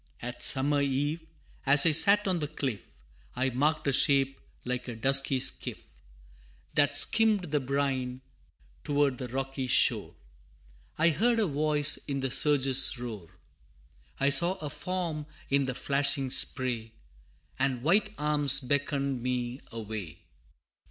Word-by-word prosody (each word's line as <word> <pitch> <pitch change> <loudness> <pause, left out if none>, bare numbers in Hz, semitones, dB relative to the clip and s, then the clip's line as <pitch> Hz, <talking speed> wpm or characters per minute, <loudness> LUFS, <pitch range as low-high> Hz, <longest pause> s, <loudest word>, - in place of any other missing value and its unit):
II. 120 - -3
At 125 - -10
summer 145 +2 +2
eve, 145 +4 -2 0.4
as 140 +2 +5
I 165 - +5
sat 200 +7 +6
on 185 -2 0
the 150 - -3
cliff, 135 -8 -5 0.5
I 130 +1 -1
marked 150 +5 -1
a 140 - +1
shape 135 -1 +2 0.3
like 125 0 -4
a 120 - -6
dusky 135 +2 +2
skiff, - - -1 0.9
That 145 -1 +2
skimmed 210 -3 +2
the 150 - +1
brine, 130 -2 -3 0.6
toward 145 -2 0
the 130 - -5
rocky 135 +1 -4
shore - - +2 0.8
I 165 +2 +3
heard 230 +9 +1
a 220 - +2
voice 150 -1 0
in 140 -2 -3
the 135 -1 -2
surge's 135 -2 +3
roar 110 -8 -8 0.9
I 140 +1 +2
saw 170 +6 +6
a 150 -5 -7
form 170 -5 -4 0.2
in 140 0 +2
the 130 -1 -4
flashing 140 -1 -1
spray, 120 -5 -2 0.7
And 130 -2 -1
white 200 +7 +2
arms 145 -2 +1
beckoned 140 -1 -2
me 125 +1 -4
away. 110 -7 -7
140 Hz, 140 wpm, -28 LUFS, 130-150 Hz, 0.9 s, sat